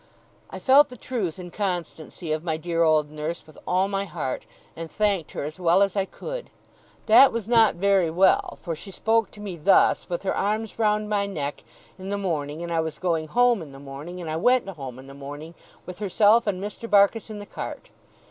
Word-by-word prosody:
I -, -, -7 dB
felt 280 Hz, +2 st, +5 dB
the 250 Hz, -, -11 dB
truth 210 Hz, -10 st, -3 dB
and 175 Hz, -1 st, -9 dB
constancy 175 Hz, -4 st, -4 dB
of 155 Hz, +1 st, -1 dB
my 160 Hz, -2 st, -1 dB
dear 165 Hz, +1 st, -2 dB
old 155 Hz, -2 st, +3 dB
nurse, 155 Hz, +3 st, -5 dB
with 155 Hz, -, -17 dB
all 185 Hz, +2 st, +2 dB
my 200 Hz, 0 st, -2 dB
heart, 155 Hz, -8 st, -4 dB, 0.3 s
and 165 Hz, 0 st, -7 dB
thanked 200 Hz, -5 st, 0 dB
her -, -, -4 dB
as 155 Hz, +4 st, -6 dB
well 180 Hz, +2 st, +4 dB
as 195 Hz, -1 st, -1 dB
I 195 Hz, -1 st, +1 dB
could. -, -, -7 dB, 0.6 s
That 230 Hz, +5 st, +7 dB
was 230 Hz, -3 st, -4 dB
not 225 Hz, -4 st, +4 dB
very 190 Hz, -1 st, +2 dB
well, 185 Hz, +4 st, +2 dB
for 165 Hz, -2 st, -3 dB
she 195 Hz, -, -9 dB
spoke 225 Hz, +3 st, +1 dB
to -, -, -16 dB
me 200 Hz, -4 st, -6 dB
thus, 195 Hz, +4 st, +3 dB
with 175 Hz, +1 st, -3 dB
her 195 Hz, -, -1 dB
arms 215 Hz, +2 st, -2 dB
round 210 Hz, -1 st, +1 dB
my 205 Hz, -1 st, 0 dB
neck, 145 Hz, -7 st, -4 dB, 0.4 s
in 190 Hz, +1 st, -7 dB
the 200 Hz, -, -1 dB
morning, 160 Hz, -5 st, -3 dB
and 170 Hz, 0 st, -4 dB
I 165 Hz, -, +1 dB
was 160 Hz, -1 st, -3 dB
going 165 Hz, -4 st, -1 dB
home 240 Hz, +2 st, +3 dB
in 145 Hz, -4 st, -10 dB
the 135 Hz, -, -11 dB
morning, 140 Hz, +6 st, -8 dB
and 170 Hz, -, -6 dB
I 155 Hz, 0 st, -2 dB
went 245 Hz, +5 st, +3 dB
home 135 Hz, -9 st, -7 dB
in 130 Hz, -, -11 dB
the 135 Hz, -, -11 dB
morning, 145 Hz, +4 st, -9 dB, 0.3 s
with 180 Hz, 0 st, -9 dB
herself 215 Hz, +3 st, +3 dB
and 190 Hz, -3 st, 0 dB
Mr. 210 Hz, +3 st, -6 dB
Barkis 205 Hz, +2 st, +4 dB
in 215 Hz, -, -6 dB
the 205 Hz, -, -8 dB
cart. -, -, -7 dB
185 Hz, 215 wpm, -25 LUFS, 160-210 Hz, 0.6 s, That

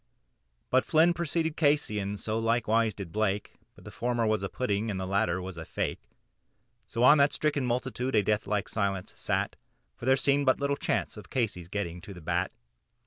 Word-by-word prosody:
But 130 Hz, 0 st, +4 dB
Flynn 165 Hz, +2 st, +4 dB
preceded 165 Hz, -2 st, -1 dB
Casey, 145 Hz, -8 st, +2 dB
and 100 Hz, +1 st, -3 dB
likewise 115 Hz, 0 st, +2 dB
so -, -, -37 dB
did 95 Hz, -5 st, -7 dB
Blake, 105 Hz, +1 st, -1 dB, 0.2 s
And -, -, -16 dB
the -, -, -8 dB
former 120 Hz, -1 st, 0 dB
was 110 Hz, -1 st, +1 dB
a 95 Hz, -, -3 dB
pudding 110 Hz, -3 st, -1 dB
and 95 Hz, -3 st, -2 dB
the 95 Hz, -, -2 dB
latter 100 Hz, -1 st, +1 dB
was 90 Hz, -1 st, -7 dB
a 80 Hz, -, -5 dB
fake; -, -, -3 dB, 0.9 s
So 115 Hz, -, -1 dB
on 145 Hz, +4 st, +8 dB
that 140 Hz, +1 st, +4 dB
stricken 145 Hz, -4 st, 0 dB
multitude 125 Hz, +1 st, -1 dB
a 105 Hz, -, +4 dB
death 105 Hz, +2 st, 0 dB
like 105 Hz, -1 st, 0 dB
silence 100 Hz, -3 st, -2 dB
sat, -, -, -1 dB, 0.4 s
For -, -, -9 dB
there 135 Hz, 0 st, +5 dB
seemed 140 Hz, +1 st, +2 dB
but 130 Hz, -, +4 dB
little 140 Hz, 0 st, +1 dB
chance 140 Hz, -, -1 dB
of 105 Hz, -, -11 dB
Casey's 100 Hz, -9 st, -1 dB
getting 90 Hz, -3 st, -4 dB
to 100 Hz, +1 st, -10 dB
the -, -, -9 dB
bat. -, -, -1 dB
110 Hz, 195 wpm, -29 LUFS, 100-130 Hz, 0.9 s, on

